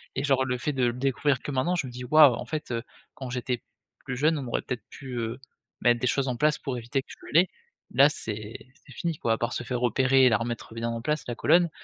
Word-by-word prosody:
et 135 Hz, -, -1 dB
genre 135 Hz, -2 st, +2 dB
le 125 Hz, -1 st, -1 dB
fait 150 Hz, +4 st, -2 dB
de 130 Hz, -2 st, +1 dB
le 120 Hz, -, +1 dB
découvrir 135 Hz, +1 st, 0 dB
que 145 Hz, -, -5 dB
maintenant 150 Hz, +7 st, +1 dB
je 160 Hz, -6 st, -1 dB
me -, -, -8 dB
dis: 125 Hz, +1 st, -7 dB
«Waouh» 150 Hz, -1 st, +7 dB
en -, -, -6 dB
fait, 155 Hz, -5 st, -5 dB
heu, 115 Hz, 0 st, -1 dB, 0.3 s
quand 130 Hz, -2 st, -7 dB
j'étais 125 Hz, -1 st, -2 dB, 0.4 s
plus 125 Hz, -2 st, -3 dB
jeune, 155 Hz, +3 st, +3 dB
on 130 Hz, -, -5 dB
aurait 120 Hz, -, -1 dB
peut-être 125 Hz, -2 st, -5 dB
pu, 135 Hz, -2 st, -10 dB
heu, 115 Hz, +2 st, -3 dB, 0.4 s
mettre 120 Hz, -1 st, +4 dB
des 125 Hz, -, 0 dB
choses 135 Hz, +2 st, +1 dB
en 120 Hz, -, -2 dB
place, 150 Hz, +2 st, +3 dB
pour 130 Hz, -4 st, -3 dB
éviter 120 Hz, +4 st, -2 dB
que -, -, -30 dB
je -, -, -11 dB, 0.2 s
l'ai. 175 Hz, +3 st, +5 dB, 0.4 s
Là 140 Hz, +4 st, +6 dB
c'est 110 Hz, -4 st, -5 dB, 0.3 s
c'est 135 Hz, -, -13 dB
fini 165 Hz, +2 st, -3 dB
quoi, 115 Hz, -, +1 dB
à -, -, 0 dB
part 120 Hz, -, -2 dB
se 120 Hz, -, -3 dB
faire 125 Hz, 0 st, -3 dB
opérer 130 Hz, +2 st, +4 dB
et 125 Hz, -, +7 dB
la 110 Hz, -, +3 dB
remettre 115 Hz, -1 st, -5 dB
bien 115 Hz, 0 st, -2 dB
en 115 Hz, 0 st, -3 dB
place 150 Hz, +3 st, -1 dB
la 120 Hz, -, -3 dB
colonne, 170 Hz, +4 st, +4 dB
130 Hz, 270 wpm, -27 LUFS, 120-145 Hz, 0.4 s, Waouh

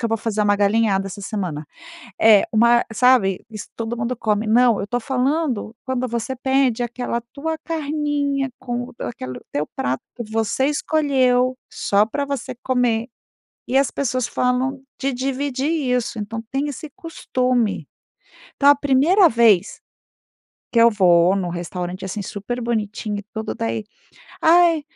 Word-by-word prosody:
que 235 Hz, -, 0 dB
eu -, -, -1 dB
vou 225 Hz, -, +1 dB
fazer 215 Hz, -1 st, -2 dB
uma 205 Hz, 0 st, +3 dB
galinhada 200 Hz, -1 st, +2 dB
essa 200 Hz, +1 st, -8 dB
semana 180 Hz, -8 st, -4 dB, 0.5 s
é 215 Hz, -3 st, +6 dB
uma 235 Hz, +2 st, +4 dB
sabe, 220 Hz, -5 st, +3 dB
isso 215 Hz, -1 st, -8 dB
todo 230 Hz, +1 st, -3 dB
mundo 235 Hz, +1 st, -3 dB
come, 215 Hz, -1 st, 0 dB
não. 235 Hz, 0 st, +4 dB
Eu 200 Hz, -, -4 dB
tô 245 Hz, +2 st, -1 dB
falando 260 Hz, -2 st, -1 dB
quando 255 Hz, -1 st, -1 dB
você 235 Hz, +2 st, -3 dB
pede 265 Hz, -2 st, +1 dB
aquela 240 Hz, 0 st, -3 dB
tua 320 Hz, +3 st, -3 dB
carninha 290 Hz, -3 st, -1 dB
com 245 Hz, 0 st, -5 dB
aquele 130 Hz, -, -6 dB
teu 150 Hz, +1 st, -2 dB
prato, 130 Hz, +1 st, -2 dB
que 240 Hz, -, -5 dB
você 225 Hz, +4 st, 0 dB
escolheu, 265 Hz, -4 st, +2 dB, 0.2 s
só 205 Hz, +1 st, +2 dB
pra 285 Hz, +5 st, -2 dB
você 275 Hz, -3 st, -4 dB
comer, 245 Hz, -3 st, +1 dB, 0.6 s
e 255 Hz, -, -1 dB
as 275 Hz, -2 st, +2 dB
pessoas 255 Hz, -3 st, -1 dB
falam 255 Hz, +2 st, 0 dB, 0.2 s
de 275 Hz, 0 st, 0 dB
dividir 270 Hz, +2 st, -2 dB
isso. 250 Hz, -8 st, -1 dB
Então, 225 Hz, +2 st, -5 dB
tem 275 Hz, +2 st, -1 dB
esse 290 Hz, +2 st, -7 dB
costume. 255 Hz, -, -1 dB, 0.7 s
Então, 280 Hz, -, +4 dB
a 285 Hz, -, +9 dB
primeira 290 Hz, +8 st, +4 dB
vez 225 Hz, -6 st, +3 dB, 0.9 s
que 235 Hz, -, +3 dB
eu 235 Hz, 0 st, +7 dB
vou 180 Hz, -3 st, +4 dB
num 185 Hz, -3 st, -2 dB
restaurante, 180 Hz, +2 st, -5 dB
assim, 200 Hz, +2 st, -4 dB
super 210 Hz, +5 st, -5 dB
bonitinho 215 Hz, -2 st, -2 dB
e -, -, -9 dB
tudo 220 Hz, 0 st, -4 dB
daí, 225 Hz, -1 st, -3 dB, 0.6 s
"Ai, 335 Hz, -1 st, +5 dB
240 Hz, 150 wpm, -21 LUFS, 215-270 Hz, 0.9 s, a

